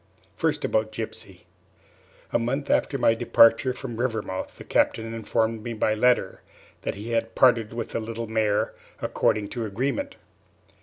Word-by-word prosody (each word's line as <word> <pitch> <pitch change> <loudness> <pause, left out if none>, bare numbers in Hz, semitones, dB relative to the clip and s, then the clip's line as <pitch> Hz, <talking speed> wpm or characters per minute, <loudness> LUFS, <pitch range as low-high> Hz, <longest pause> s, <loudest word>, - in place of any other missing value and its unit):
First - - 0
about 110 0 0
Gypsy. 110 0 -7 0.9
A - - +3
month 135 +5 -1
after 140 - +2
my 115 - +4
departure 115 +2 +5
from 125 -2 -6
Rivermouth 110 -6 -3
the - - -9
Captain 115 0 +1
informed 115 0 -1
me 115 +2 -5
by 110 -1 +1
letter 115 -3 +2 0.4
that - - -3
he 105 +4 -6
had 115 0 -1
parted 115 -4 +4
with 115 0 -4
the - - -2
little 115 +1 -5
mare, 110 -2 0 0.3
according 105 -2 0
to 120 - -4
agreement. 135 - -2
115 Hz, 150 wpm, -25 LUFS, 110-120 Hz, 0.9 s, departure